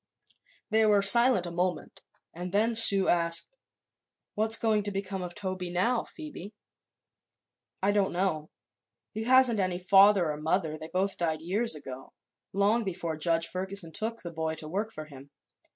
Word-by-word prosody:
They 220 0 +3
were 205 -1 +3
silent 235 -1 +4
a 175 - -6
moment 175 -1 -3 0.3
and 180 +2 -7
then 220 +4 +1
Sue 200 -4 +8
asked: 170 - -1 0.8
"What's 220 +2 +3
going 220 -2 0
to 205 - -2
become 195 -1 -5
of 175 -1 -7
Toby 185 -3 -5
now, 230 +8 0
Phoebe?" 275 - -10 1.3
"I 200 - +2
don't 205 -2 0
know. 175 -4 -2 0.6
He 220 +1 -5
hasn't 255 -3 +4
any 185 -2 -1
father 195 -2 +4
or 150 - -6
mother; 160 +1 -2
they 155 0 -9
both 190 +2 -2
died 160 -2 -2
years 205 +4 +1
ago, 135 -3 -11 0.4
long 205 +4 +1
before 170 -4 -5
Judge 165 +1 0
Ferguson 185 -1 -5
took 225 +5 -4
the 170 -1 -8
boy 160 0 -3
to 155 - -10
work 205 +7 -4
for 155 -7 -9
him. 140 -2 -14
190 Hz, 160 wpm, -27 LUFS, 170-210 Hz, 1.3 s, Sue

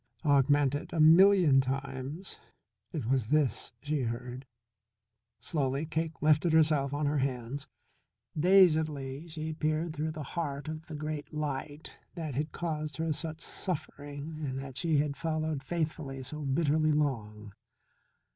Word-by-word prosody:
augmented 145 0 +3
a 165 - -2
million 165 -3 +7
times. 135 +5 -4 0.5
It 150 -8 -3
was 125 -2 +1
this 150 -1 +1
she 150 -1 0
heard. 125 +2 -4 0.9
Slowly 140 -1 -1
Cake 160 0 -3
lifted 155 +2 +4
herself 150 -4 +4
on 145 +1 -1
her 145 0 +1
hands, 130 +1 -3 0.7
dazedly 155 -5 +3
she 160 -1 -5
peered 155 +1 -1
through 155 +1 -2
the 155 -1 -5
heart 145 -3 -3
of 155 0 -6
the 155 - -6
great 150 -1 -4
light 150 0 -4 0.2
that 160 -4 -4
had 150 +4 -2
caused 155 -3 -3
her 160 -1 0
such 160 +1 -5
suffering 145 -3 -5
and 130 -2 -3
that 135 -1 -6
she 160 0 +1
had 145 0 +1
followed 155 -3 -1
faithfully 150 -3 -3
so 150 +4 -6
bitterly 155 +2 +2
long. 110 -8 -2
150 Hz, 135 wpm, -30 LUFS, 135-160 Hz, 0.9 s, million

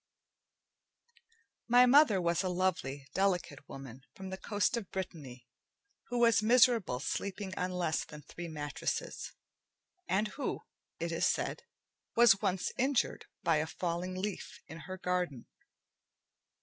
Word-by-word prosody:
My 245 +1 +7
mother 250 -5 +6
was 170 -1 +1
a 185 - -1
lovely, 175 -7 -1
delicate 180 -7 -1
woman 135 -2 -9
from 190 0 -8
the 190 - -4
coast 205 +3 0
of 225 -6 -4
Brittany, 145 -10 -6 0.6
who 245 - -3
was 230 -3 +5
miserable 230 - +4
sleeping 190 +5 -3
on 180 - -1
less 175 -3 0
than 150 -1 -11
three 170 +4 -8
mattresses, 145 -3 -4 0.8
and 210 +3 +1
who, 280 - -4 0.4
it - - -2
is - - +2
said, - - -1 0.5
was 230 -4 +6
once 185 -1 0
injured 265 0 +1 0.2
by 165 -2 +3
a 155 +1 0
falling 175 +2 -3
leaf 200 +1 -5
in 160 - -9
her 185 +3 -7
garden. 180 -9 -2
185 Hz, 130 wpm, -32 LUFS, 160-210 Hz, 0.8 s, My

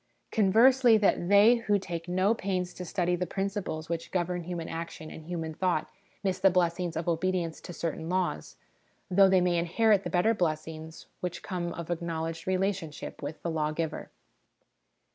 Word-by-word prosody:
Con 205 -4 +2
versely, 245 +1 +6
that 195 -4 +1
they 205 +4 +7
who 210 -3 +1
take 170 -3 -5
no 185 +4 +2
pains 185 -4 -2
to 180 - -7
study 175 +1 0
the 180 0 -2
principles 195 -4 -3
which 165 0 -4
govern 175 -1 -2
human 175 -2 -4
action 165 -1 -6
and 160 - -10
human 165 -2 -4
thought 180 +2 -1 0.3
miss 190 -1 0
the 195 - +6
blessings 175 -2 0
of 165 - -3
obedience 170 -1 -1
to - - -8
certain 165 -1 -4
laws, 180 - -1 0.6
though 195 +1 +6
they 190 -1 +4
may 175 -1 +2
inherit 200 +4 +3
the - - -3
better 195 +5 +3
blessings 160 -3 -3
which 180 -1 -4
come 175 -2 -3
of 170 0 -6
acknowledged 165 -1 -3
relationship 185 -4 -2
with 145 +2 -6
the 170 - -1
Lawgiver. 155 0 -2
175 Hz, 165 wpm, -29 LUFS, 165-190 Hz, 0.6 s, they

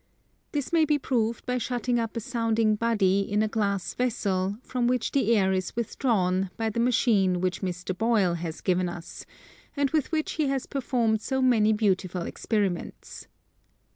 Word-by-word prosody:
This 290 +1 -3
may 330 -1 +5
be 300 -1 +2
proved 235 -4 -1
by 250 0 -1
shutting 245 0 -1
up 230 0 -3
a - - -2
sounding 225 -2 +1
body 210 -4 +2
in 205 +2 0
a - - +1
glass 200 -3 -1
vessel 200 -5 -1
from 250 -2 -1
which 250 -1 0
the 235 -4 +2
air 190 -1 +2
is 185 -1 -2
withdrawn 195 -6 0
by 225 -1 -1
the 235 - -3
machine 225 -7 +2
which 185 0 -1
Mr. 180 0 -3
Boyle 215 -4 +2
has 165 -1 -5
given 180 -1 +1
us, 175 -1 -9 0.5
and 280 -1 +1
with 310 -2 0
which 310 -1 -1
he 310 -3 0
has 270 -1 -1
performed 235 -5 0
so 265 +4 -1
many 235 -5 +4
beautiful 190 -4 0
experiments. 200 -4 -3
220 Hz, 170 wpm, -26 LUFS, 190-250 Hz, 0.5 s, may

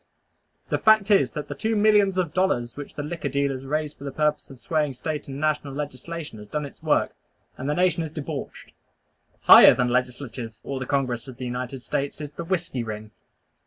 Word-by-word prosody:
The - - 0
fact 220 -2 +5
is 200 - +5
that 150 -1 -4
the - - -4
two 225 0 -1
millions 205 -2 +4
of 175 -4 0
dollars 120 -11 0
which 145 -1 -8
the 145 - -4
liquor 150 -1 -4
dealers 135 -1 -1
raised 150 +1 -2
for - - -10
the 140 - -4
purpose 150 +1 0
of 135 - -12
swaying 150 -3 -1
State 150 +4 -4
and 135 0 -6
national 145 -2 -1
legislation 150 -1 -6
has 105 - -11
done 150 +5 -3
its 140 - -12
work, - - +1 0.4
and 135 +2 -4
the 150 - +1
nation 180 -1 +2
is 160 - -3
debauched. 150 -2 -7 0.7
Higher - - +9
than 125 0 +1
legislatures 125 -2 -3
or 135 -1 -4
the 130 - -5
Congress 130 -4 -1
of 130 -2 -10
the 130 - -5
United 125 +1 -4
States 140 +3 -2
is 150 -1 -6
the 170 - -6
Whiskey 170 -8 -2
Ring! 110 -1 -7
145 Hz, 200 wpm, -25 LUFS, 130-160 Hz, 0.7 s, Higher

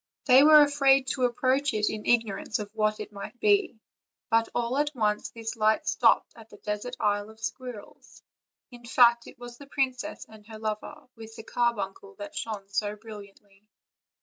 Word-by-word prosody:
They 260 0 +7
were 305 0 +8
afraid 275 -2 +3
to 260 -1 0
approach 260 +3 0
it 210 0 +1
in 215 -1 -7
ignorance 225 -1 0
of 210 -2 -7
what 215 -1 0
it 210 - -7
might 210 +4 -9
be; 405 - +2 0.5
but 225 0 +2
all 240 +3 -1
at 295 0 -1
once 210 -3 -1
this 225 -1 -6
light 215 0 +1
stopped - - +2
at 225 -1 -15
the 210 - -14
desert 210 +5 -5
Isle 205 -1 0
of 220 0 -16
Squirrels; 240 0 -8 0.5
in 240 -1 -13
fact, 235 0 +4
it - - -13
was 245 0 -11
the 285 - -12
princess 270 +1 -3
and 215 -1 -16
her 220 -1 -10
lover, 220 +8 -6
with 225 -1 -12
the - - -9
carbuncle 200 -5 -2
that 305 +5 -9
shone 210 -6 -5
so 205 +1 -2
brilliantly. 205 -1 -14
225 Hz, 175 wpm, -27 LUFS, 210-255 Hz, 0.5 s, were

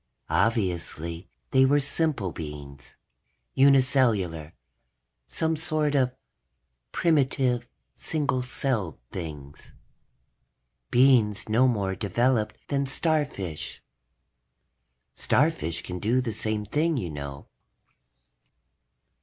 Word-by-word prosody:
Obviously 85 -3 -1 0.2
they 130 0 +5
were 140 +2 +4
simple 140 - -1
beings, 75 -3 -9 0.6
uni 135 0 +6
cellular, 100 - 0 0.7
some 160 - 0
sort 155 -1 0
of 130 -3 +2 0.8
primitive 130 -6 +1 0.3
single 140 -5 -1
celled 125 - -2
things. 75 -5 -8 1.2
Beings 120 -5 +4
no 115 +4 +4
more 100 -6 0
developed 110 +3 0
than 140 -1 0
starfish. 140 - -1 1.3
Starfish 125 - 0
can 90 0 -5
do 115 +6 +2
the 120 -3 -2
same 110 0 -2
thing, 155 +8 0
you 90 -9 -3
know. 70 -1 -7
120 Hz, 85 wpm, -26 LUFS, 90-140 Hz, 1.3 s, uni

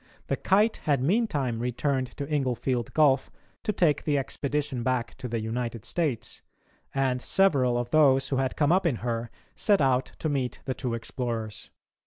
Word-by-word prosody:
The - - +2
Kite 210 +4 +2
had 145 -3 +1
meantime 145 - +1
returned 130 +2 -1
to 140 - -3
Inglefield 130 -4 -1
Gulf 145 -3 +4 0.3
to - - 0
take 170 -7 +2
the 145 -2 +1
expedition 140 -1 -2
back 120 -1 -1
to 130 - -4
the 115 -1 -2
United 115 0 -3
States, 130 -10 -2 0.5
and 130 -2 0
several 135 -12 +3
of 120 0 -3
those 135 -4 +4
who 135 - 0
had 130 -1 0
come 145 0 +2
up 185 0 +3
in 145 - +1
her 115 -1 -2 0.2
set 205 -2 +3
out 130 -1 +1
to - - -2
meet 135 -4 -1
the 130 - -1
two 125 -2 -3
explorers. 115 -2 -4
130 Hz, 170 wpm, -27 LUFS, 120-150 Hz, 0.5 s, Gulf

